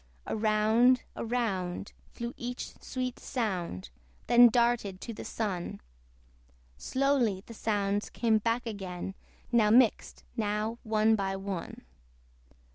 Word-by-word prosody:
Around, 220 +3 +3
around, 200 -6 -2 0.2
flew 235 +1 -6
each 245 +1 -5
sweet 255 -1 -4
sound, 180 - -3 0.3
Then 240 0 +8
darted 235 -5 +1
to 230 - -5
the - - -7
Sun; 185 - -3 1.0
Slowly 250 - +1
the 230 - -10
sounds 205 -2 -1
came 225 -2 +2
back 230 +3 0
again, 190 -4 -5 0.4
Now 225 -3 +4
mixed, 235 0 +3
now 215 +1 -1
one 220 0 +3
by 195 -2 -1
one. 195 -3 -5
220 Hz, 110 wpm, -30 LUFS, 200-240 Hz, 1.0 s, Then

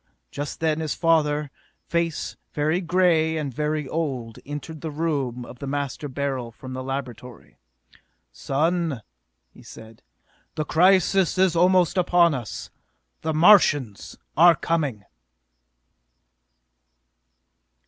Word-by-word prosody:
Just 145 +2 -6
then 160 -1 +1
his 155 -2 -2
father, 150 -3 +1 0.3
face 170 -2 -2 0.2
very 155 +4 0
gray 165 -3 +2
and 145 -4 -4
very 150 +1 -2
old, 130 -8 -4
entered 145 +2 -7
the 160 - -4
room 145 -6 -2
of 120 - -12
the 140 - -6
Master 145 +1 -3
Beryl 130 -3 -3
from 130 +3 -10
the 130 - -5
laboratory. 125 -3 -7 0.7
"Son!" 160 -3 -1 0.5
he - - -16
said. 110 0 -13 0.5
"The 155 -1 -2
crisis 185 +3 +3
is 185 -2 +3
almost 180 +1 +3
upon 175 -2 +4
us! 120 -6 -6 0.5
The 160 -1 -2
Martians 145 - +4 0.2
are 170 +1 +7
coming!" 145 -11 -2
150 Hz, 110 wpm, -24 LUFS, 135-165 Hz, 0.7 s, are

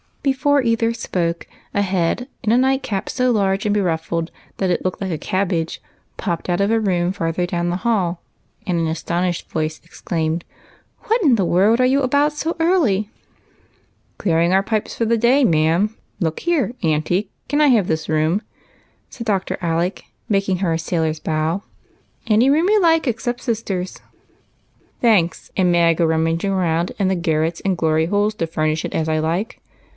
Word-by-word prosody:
Before 285 +1 +2
either 230 -1 +1
sj^oke, 175 -7 -2 0.3
a 200 - +1
head, 190 +5 0 0.2
in 220 - +1
a 235 - +5
nightcap 260 -6 0
so 255 -1 +1
large 195 -2 +1
and 205 - +2
beruffled 165 -3 -1 0.3
that 190 - 0
it 175 - 0
looked 185 - -2
like 190 -2 -2
a 160 - -1
cabbage, 175 -2 -2 0.4
popped 170 - -3
out 175 +2 +1
of 200 - +2
a 225 - +3
room 180 -4 +1
farther 170 -1 -1
down 175 0 -1
the 175 - -1
hall, 190 -6 0 0.4
and 180 -4 0
an 165 - 0
astonished 170 +2 -2
voice 155 0 -2
exclaimed, 165 -1 -3 0.2
— - - -28
" - - -43
What 455 +2 +2
in 275 -7 +5
the 195 -5 +1
world 200 +7 +3
are 255 - +4
you 275 +2 +2
about 285 +3 +2
so 320 +3 -2
early? 285 - +2 0.4
" - - -36 0.2
*' - - -41
Clearing 170 -1 +2
our 195 +1 +4
pipes 215 +1 -2
for 230 - 0
the 230 +1 +2
day, 245 +5 +4
ma'am. 170 +3 +2 0.2
Look 160 -4 -2
here, 325 -9 0
auntie, 165 +5 0 0.2
can 290 +2 +1
I 300 - +6
have 225 -9 +4
this 160 -1 -2
room? 160 +7 +1 0.3
" - - -38
said 230 - -7
Dr. 195 -4 -1
Alec, 170 +2 -1 0.3
making 195 -2 +1
her 180 -3 0
a 165 - -1
sailor's 160 -2 -1
bow. 160 +5 -1 0.3
" - - -39
Any 225 +4 +4
room 320 +6 +3
you 425 -1 +4
like, 325 -3 +3
except 240 +1 -2
sister's." 195 -5 -3 0.5
" - - -39
Thanks. 200 -8 +2
And 180 -2 +3
may 170 -1 +4
I - - +5
go 165 +1 +1
rummaging 165 +4 0
round 175 -2 0
in 200 -4 +1
the 190 - +1
garrets 165 -1 -1
and 190 -2 0
glory 160 -1 +1
holes 205 +3 +1
to 165 - -2
furnish 155 -1 -1
it - - -5
as 160 - -1
I 155 0 +1
like?" 170 +7 -2
185 Hz, 190 wpm, -20 LUFS, 165-230 Hz, 0.5 s, I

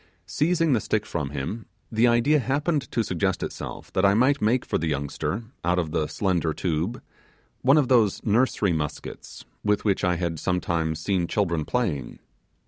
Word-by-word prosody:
Seizing 165 -1 +1
the 120 - +3
stick 105 0 -1
from 75 -5 -3
him, 75 +11 -5 0.2
the 115 +2 +4
idea 120 +6 +4
happened 145 +2 0
to 115 - +1
suggest 95 -1 -1
itself, - - -7
that 95 - +1
I 100 0 +5
might 135 +5 +3
make 115 +4 +2
for - - -1
the 80 - -1
youngster, 75 +9 -2 0.2
out 90 +2 +1
of 85 -3 -1
the 75 -2 0
slender 85 -5 0
tube, 90 +6 -2 0.6
one 135 +4 +5
of 145 -4 +3
those 115 -6 +3
nursery 110 -4 +2
muskets 75 -2 -5 0.2
with 105 0 +1
which 100 -3 +1
I 90 -1 +2
had 85 -2 -2
sometimes 85 -3 -1
seen 90 0 0
children 85 -7 0
playing. 85 - -2
100 Hz, 170 wpm, -25 LUFS, 85-120 Hz, 0.6 s, I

